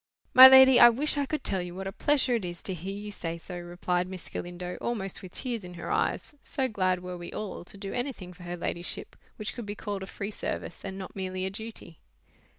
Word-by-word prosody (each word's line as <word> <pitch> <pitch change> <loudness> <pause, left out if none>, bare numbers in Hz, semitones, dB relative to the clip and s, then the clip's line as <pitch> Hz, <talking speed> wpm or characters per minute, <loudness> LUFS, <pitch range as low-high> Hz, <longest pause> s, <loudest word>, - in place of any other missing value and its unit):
"My 260 +1 +13
lady, 265 -1 +9
I 240 - +11
wish 280 +7 +1
I 285 -1 0
could 305 -1 -3
tell 190 -2 0
you 175 0 -7
what 190 +1 -5
a 195 - -3
pleasure 275 +3 +2
it 230 -4 0
is 175 -1 -6
to 190 - -3
hear 185 +3 -5
you 210 0 -6
say 170 -4 -4
so," 175 +1 -8
replied 175 +1 -2
Miss 185 -2 -8
Galindo, 175 0 -5
almost 195 -6 -3
with 185 -1 -11
tears 240 -5 -3
in 180 0 -9
her 170 - -5
eyes; - - 0
so 265 -1 -1
glad 185 -5 0
were 180 -1 -6
we 175 - -7
all 205 -5 -5
to 200 - -10
do 195 0 -6
anything 245 -8 -4
for 180 - -16
her 175 0 -5
ladyship, 170 +1 -4 0.2
which 215 - -4
could 235 -4 -7
be 205 - -4
called 205 -2 -4
a 190 - -6
free 200 +1 -5
service - - -5
and 190 -1 -5
not 190 -1 -8
merely 185 -1 -3
a 190 - -2
duty. 220 -5 -8
190 Hz, 240 wpm, -28 LUFS, 180-230 Hz, 0.2 s, My